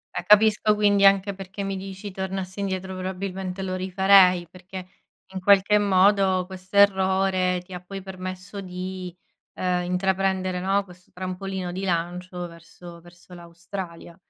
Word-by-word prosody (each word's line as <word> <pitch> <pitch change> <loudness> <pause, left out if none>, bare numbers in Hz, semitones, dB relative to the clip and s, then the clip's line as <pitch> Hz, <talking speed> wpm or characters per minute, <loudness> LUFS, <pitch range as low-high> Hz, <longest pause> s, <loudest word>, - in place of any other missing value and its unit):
Eh - - -2
capisco 210 0 +5
quindi 205 -1 +4
anche 195 0 +3
perché 195 +1 -7
mi 195 0 -3
dici: 195 +1 -7
"Tornassi 190 0 -5
indietro 190 -1 -3
probabilmente 185 0 -4
lo 185 -1 -3
rifarei", 185 -1 +4
perché 185 +1 -10 0.5
in 190 - -4
qualche 200 +2 +5
modo 195 -1 +3
questo 185 +1 -7
errore 190 -2 +3
ti 185 - -12
ha 180 - -5
poi 195 +1 -8
permesso 185 +1 -7
di, 185 0 -6 0.4
ehm, 180 -1 0
intraprendere, 185 0 0
no, 195 +2 +1
questo 180 -1 -18
trampolino 185 0 -5
di 185 +2 -5
lancio 180 0 -3
verso 170 +1 -13
verso 175 +1 -17
l'Australia. 170 0 -9
185 Hz, 140 wpm, -24 LUFS, 180-195 Hz, 0.5 s, capisco